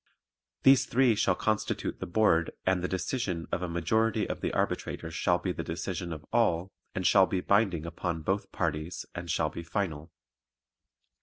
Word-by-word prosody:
These 135 Hz, 0 st, +6 dB
three 125 Hz, -1 st, +4 dB
shall 105 Hz, -, +2 dB
constitute 110 Hz, -1 st, -1 dB
the -, -, -4 dB
Board 85 Hz, -4 st, +3 dB, 0.2 s
and 95 Hz, -1 st, +2 dB
the 90 Hz, -, -1 dB
decision 95 Hz, -3 st, -2 dB
of 90 Hz, -, -1 dB
a 90 Hz, -, -2 dB
majority 110 Hz, +6 st, +1 dB
of -, -, -4 dB
the -, -, -1 dB
arbitrators 80 Hz, -1 st, -2 dB
shall 90 Hz, +2 st, +2 dB
be 90 Hz, +1 st, -2 dB
the -, -, -4 dB
decision 85 Hz, -, -4 dB
of 75 Hz, -2 st, -7 dB
all 85 Hz, +4 st, +2 dB, 0.2 s
and 95 Hz, -, -2 dB
shall 95 Hz, -2 st, +6 dB
be 95 Hz, -, -1 dB
binding 95 Hz, -5 st, +2 dB
upon 85 Hz, -1 st, -3 dB
both 95 Hz, +3 st, -1 dB
parties 80 Hz, 0 st, -2 dB
and 85 Hz, 0 st, -6 dB
shall 75 Hz, -2 st, +1 dB
be -, -, -6 dB
final. 85 Hz, -2 st, -3 dB
90 Hz, 170 wpm, -29 LUFS, 85-100 Hz, 0.2 s, These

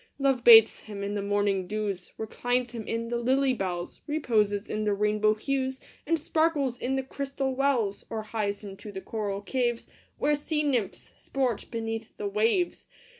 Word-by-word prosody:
Love 270 Hz, -3 st, +1 dB
bathes 225 Hz, -2 st, +9 dB
him 205 Hz, -2 st, -6 dB
in 200 Hz, +1 st, -2 dB
the 205 Hz, -, -1 dB
morning 200 Hz, -2 st, 0 dB
dews, 200 Hz, -3 st, -3 dB
Reclines 245 Hz, +3 st, -1 dB
him 230 Hz, -3 st, -6 dB
in 230 Hz, 0 st, -2 dB
the 240 Hz, 0 st, -1 dB
lily 260 Hz, +2 st, +2 dB
bells, 180 Hz, -6 st, -4 dB
Reposes 215 Hz, -9 st, +1 dB
in 215 Hz, 0 st, -2 dB
the 210 Hz, -1 st, +1 dB
rainbow 210 Hz, +1 st, +2 dB
hues, 265 Hz, +3 st, -2 dB, 0.3 s
And 330 Hz, +1 st, +3 dB
sparkles 315 Hz, -4 st, +1 dB
in 265 Hz, +2 st, -1 dB
the 265 Hz, -, -1 dB
crystal 275 Hz, 0 st, -3 dB
wells, 255 Hz, -7 st, +1 dB
Or 220 Hz, -1 st, -3 dB
hies 210 Hz, -1 st, -2 dB
him 195 Hz, -2 st, -7 dB
to 210 Hz, -, -9 dB
the 190 Hz, -, -5 dB
coral 200 Hz, -2 st, -3 dB
caves, 240 Hz, 0 st, -1 dB, 0.3 s
Where 295 Hz, -, +2 dB
sea 300 Hz, +1 st, 0 dB
nymphs 245 Hz, -9 st, -1 dB
sport 255 Hz, -5 st, -1 dB
beneath 225 Hz, -1 st, -4 dB
the 205 Hz, -, -3 dB
waves. 225 Hz, -, +1 dB
225 Hz, 175 wpm, -28 LUFS, 205-265 Hz, 0.3 s, bathes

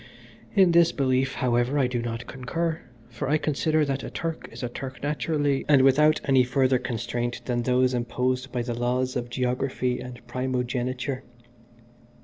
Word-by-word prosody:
In 190 Hz, -3 st, +6 dB
this 170 Hz, 0 st, +5 dB
belief, 130 Hz, -2 st, +1 dB
however, 120 Hz, +2 st, +1 dB
I 135 Hz, -, +3 dB
do 125 Hz, -1 st, -1 dB
not 115 Hz, 0 st, -4 dB
concur, 160 Hz, +6 st, -3 dB, 0.3 s
for 135 Hz, -, -4 dB
I 155 Hz, -, +4 dB
consider 155 Hz, +1 st, +1 dB
that 135 Hz, -1 st, -2 dB
a -, -, -5 dB
Turk 165 Hz, -1 st, -4 dB
is -, -, -8 dB
a 120 Hz, -, -2 dB
Turk 130 Hz, +2 st, -7 dB
naturally, 145 Hz, -1 st, 0 dB
and 140 Hz, -3 st, +6 dB
without 150 Hz, +3 st, +5 dB
any 135 Hz, -2 st, +4 dB
further 130 Hz, 0 st, +2 dB
constraint 120 Hz, 0 st, -3 dB
than 120 Hz, -1 st, 0 dB
those 125 Hz, +1 st, +2 dB
imposed 125 Hz, +2 st, -1 dB
by 120 Hz, -1 st, -1 dB
the 120 Hz, 0 st, -3 dB
laws 125 Hz, +2 st, -1 dB
of 120 Hz, -1 st, -3 dB
geography 125 Hz, 0 st, -1 dB
and 125 Hz, -1 st, -8 dB
primogeniture. 130 Hz, +1 st, -2 dB
130 Hz, 160 wpm, -26 LUFS, 125-140 Hz, 0.3 s, In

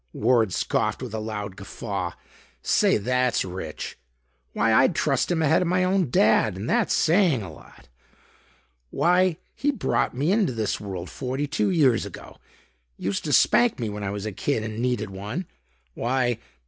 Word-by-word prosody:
Ward 115 Hz, -3 st, +2 dB
scoffed 110 Hz, +6 st, -1 dB
with 120 Hz, -4 st, -7 dB
a 110 Hz, -, -2 dB
loud 105 Hz, -3 st, -5 dB
guffaw. 95 Hz, -2 st, -5 dB, 0.5 s
"Say, -, -, +3 dB
that's 125 Hz, +2 st, +1 dB
rich. 90 Hz, -8 st, -6 dB, 0.5 s
Why, -, -, +2 dB
I'd -, -, +4 dB
trust -, -, +1 dB
him 165 Hz, -2 st, +1 dB
ahead 150 Hz, -, +3 dB
of 180 Hz, -, 0 dB
my 180 Hz, +1 st, +2 dB
own 185 Hz, -4 st, +1 dB
Dad 110 Hz, -3 st, +3 dB
and 100 Hz, +4 st, -5 dB
that's -, -, +1 dB
saying 165 Hz, -, +3 dB
a 85 Hz, -5 st, -8 dB
lot. -, -, -17 dB, 1.0 s
Why 180 Hz, -, +2 dB, 0.2 s
he 290 Hz, -, -1 dB
brought 270 Hz, -, 0 dB
me 145 Hz, +7 st, +1 dB
into 200 Hz, -, +2 dB
this 110 Hz, -3 st, -2 dB
world 95 Hz, -4 st, -6 dB
forty 130 Hz, +2 st, -3 dB
two 205 Hz, +8 st, 0 dB
years 140 Hz, -, +3 dB
ago. -, -, -10 dB, 0.6 s
Used 100 Hz, -, -3 dB
to 150 Hz, -, -2 dB
spank 240 Hz, -, +4 dB
me 115 Hz, -3 st, -2 dB
when 105 Hz, 0 st, -6 dB
I 100 Hz, -, -2 dB
was 100 Hz, +1 st, -4 dB
a 110 Hz, -, -3 dB
kid 110 Hz, +3 st, -1 dB
and 110 Hz, 0 st, -5 dB
needed 120 Hz, -5 st, -1 dB
one. 105 Hz, -, -5 dB, 0.5 s
Why...." 120 Hz, -, 0 dB
120 Hz, 170 wpm, -25 LUFS, 105-160 Hz, 1.0 s, I'd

